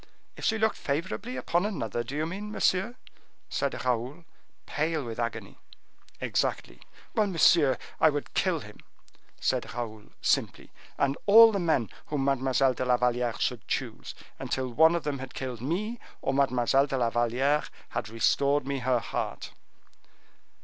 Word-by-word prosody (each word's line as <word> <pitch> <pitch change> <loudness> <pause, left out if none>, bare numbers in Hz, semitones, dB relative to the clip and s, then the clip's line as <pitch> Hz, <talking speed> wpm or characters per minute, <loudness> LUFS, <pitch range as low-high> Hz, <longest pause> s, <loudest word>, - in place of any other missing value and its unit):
"If - - -11
she 220 - +2
looked 220 0 +1
favorably 190 - -3
upon 175 +1 0
another, 120 - -2
do 130 +4 -7
you 155 +1 0
mean, 200 +5 -5
monsieur?" 195 +3 +1 0.5
said 140 -2 -2
Raoul, 125 +7 -2 0.4
pale 155 0 -1
with 115 0 -6
agony. 115 0 -4 0.6
"Exactly." - - -2 0.3
"Well, 215 -1 +2
monsieur, 165 -6 +4 0.2
I 160 - +6
would 145 -1 -4
kill - - +1
him," - - -12 0.6
said - - -1
Raoul, 110 -3 -5
simply, - - 0 0.3
"and 140 0 +1
all 225 +2 +9
the 200 - -1
men 160 - +1 0.2
whom 145 -3 -1
Mademoiselle 135 -1 +2
de 130 - -3
la 125 -1 +3
Valliere 120 -1 0
should 120 -5 -2
choose, - - -4 0.2
until 130 -1 -2
one 160 +7 +5
of 170 - -2
them 145 -2 -2
had 130 0 -8
killed 125 -4 -5
me, 205 - -2 0.2
or 135 - 0
Mademoiselle 135 0 +3
de 135 -1 -2
la 120 -2 +1
Valliere 125 +6 +2 0.3
had 110 - -4
restored 140 +5 +2
me 140 0 -2
her 130 0 +2
heart." 115 - -4
140 Hz, 155 wpm, -28 LUFS, 125-165 Hz, 0.6 s, all